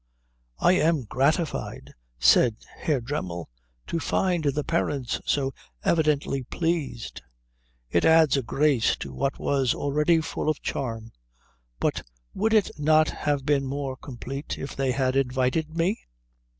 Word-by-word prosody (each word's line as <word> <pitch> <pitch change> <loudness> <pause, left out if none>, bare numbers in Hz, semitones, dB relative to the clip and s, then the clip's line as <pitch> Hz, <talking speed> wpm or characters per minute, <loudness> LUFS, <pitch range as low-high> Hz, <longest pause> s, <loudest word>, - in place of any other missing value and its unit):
"I - - +4
am 160 -3 +2
gratified," 145 - -1 0.2
said 90 - +5 0.2
Herr 145 -5 0
Dremmel, 90 - -4 0.4
"to 170 - -2
find 175 -2 0
the 145 +1 +1
parents 140 -6 -1
so 135 -2 +1 0.3
evidently 150 -4 +1
pleased. 150 -4 -3 0.7
It 85 - +2
adds 160 -3 +5
a 135 - +1
grace 135 -1 +2
to - - -7
what 135 0 -1
was 135 -3 +1
already 150 +4 +2
full 155 0 -2
of 155 - 0
charm. 115 -4 -4 0.7
But - - 0 0.3
would 220 +3 +1
it 210 -3 +3
not 155 +1 +4
have 145 -2 -1
been 140 -2 +2
more 135 -1 -3
complete 135 +2 -6
if 135 - -6
they 135 -1 0
had 130 0 0
invited 135 +4 0
me?" 180 +6 +1
140 Hz, 135 wpm, -26 LUFS, 130-155 Hz, 0.7 s, said